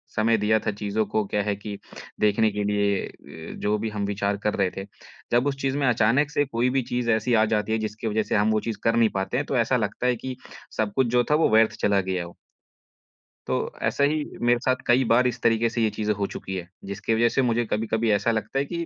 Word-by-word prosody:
समय 115 +1 +3
दिया 110 +1 +2
था - - -2
चीज़ों 105 +1 -2
को 105 +1 0
क्या 105 +1 -1
है 105 0 -1
कि 105 0 -7 0.4
देखने 105 +1 +3
के 105 0 -2
लिए 100 -1 +1
अ, 80 0 -11
जो 105 +1 0
भी 110 +1 -3
हम 105 -1 -3
विचार 100 0 -1
कर 105 - +1
रहे 95 -2 +1
थे। 95 - -4 0.5
जब 120 +3 +3
उस 140 - 0
चीज़ 135 0 0
में 140 -2 +1
अचानक 125 +5 +3
से 145 - +1
कोई 125 -1 0
भी 135 +1 +1
चीज़ 125 -1 -1
ऐसी 110 +2 +1
आ 110 -1 +5
जाती 105 +1 -1
है 110 - +2
जिसकी 110 +1 -4
वज़ह 110 0 +1
से - - -2
हम 105 +1 +3
वो 110 - +2
चीज़ 110 - -3
कर 115 - +2
नहीं 115 -1 +4
पाते 95 0 -1
हैं, - - -1
तो - - -1
ऐसा - - +2
लगता 125 - -2
है 125 - +2
कि 130 +2 -6 0.4
सब 105 -2 0
कुछ 130 -2 +3
जो 120 - +4
था 150 - +5
वो 160 - +3
व्यर्थ 110 0 +5
चला 100 -1 +3
गया 95 -1 -2
हो। 85 - -13 1.1
तो - - 0 0.3
ऐसे 140 - +2
ही 150 +1 0 0.2
मेरे 120 0 +3
साथ 130 - +3
कई 125 +2 +4
बार 125 +2 +5
इस 125 0 -4
तरीके 115 0 +2
से 120 0 -2
ये 110 - +3
चीज़ें 105 0 -1
हो 100 0 -1
चुकी 95 - -6
है, 90 -2 -5 0.2
जिसकी 100 +3 -2
वज़ह 120 +1 +3
से - - +4
मुझे 120 -1 +1
कभी-कभी 110 +1 0
ऐसा 105 +3 +2
लगता 115 +5 -2
है 140 - 0
कि 170 +3 -4
110 Hz, 255 wpm, -25 LUFS, 105-120 Hz, 1.1 s, आ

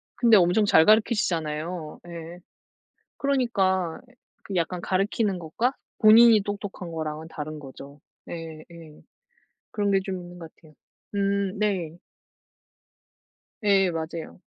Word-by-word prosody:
근데 235 -2 +5
엄청 190 +2 +4
잘 160 -5 +6
가르치시잖아요. 170 -7 0
예. 170 0 -9 0.8
그러니까 195 -11 0 0.6
약간 175 0 -1
가르치는 195 +1 0
것과 175 +10 -1 0.3
본인이 220 0 +7
똑똑한 200 -3 -6
거랑은 155 0 -5
다른 155 -1 -6
거죠. 140 0 -12 0.3
네 160 -2 -8
예. 165 -3 -13 0.7
그런 205 -1 0
게 195 - +4
좀 190 -2 -4
있는 175 0 -11
것 165 -2 -10
같아요. 155 -2 -21 0.4
음 200 0 0
네. 185 -6 -1 1.6
네, 195 -3 +3
맞아요. 165 0 -6
180 Hz, 230 characters per minute, -25 LUFS, 160-205 Hz, 1.6 s, 본인이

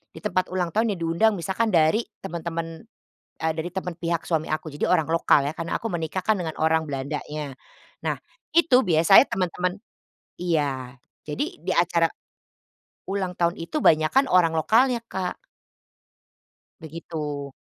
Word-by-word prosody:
di - - -8
tempat 185 -3 0
ulang 180 -3 -1
tahun 220 -2 +1
yang - - -11
diundang 190 +7 +3
misalkan 195 +5 -1
dari 165 +9 +4 0.2
teman-teman, 165 +1 -5 0.5
eee, 160 0 +1
dari 165 +2 -3
teman 180 -2 -3
pihak 170 -1 -1
suami 160 -2 0
aku, 155 +1 -2
jadi - - 0
orang 160 -3 +2
lokal 145 -3 +3
ya, - - -5
kan 165 - -3
aku 225 - -2
menikah 175 +1 -3
kan 220 -2 +3
dengan 165 -3 -3
orang 160 0 +2
Belandanya. 145 0 -5 0.5
Nah, - - +1 0.4
itu 310 -7 +5
biasanya 170 - +6
teman-teman 180 +1 -1 0.6
iya, 140 -7 -1 0.3
jadi 150 - -1 0.2
di - - -5
acara 170 -1 +3 1.0
ulang 190 -2 -2
tahun 170 0 +1
itu 300 - -4
banyakan 160 - +4
orang 170 -3 +4
lokalnya, 235 +7 +3
Kak. 190 -4 -3 1.5
Begitu, 150 -3 -5
170 Hz, 145 wpm, -24 LUFS, 155-190 Hz, 1.5 s, biasanya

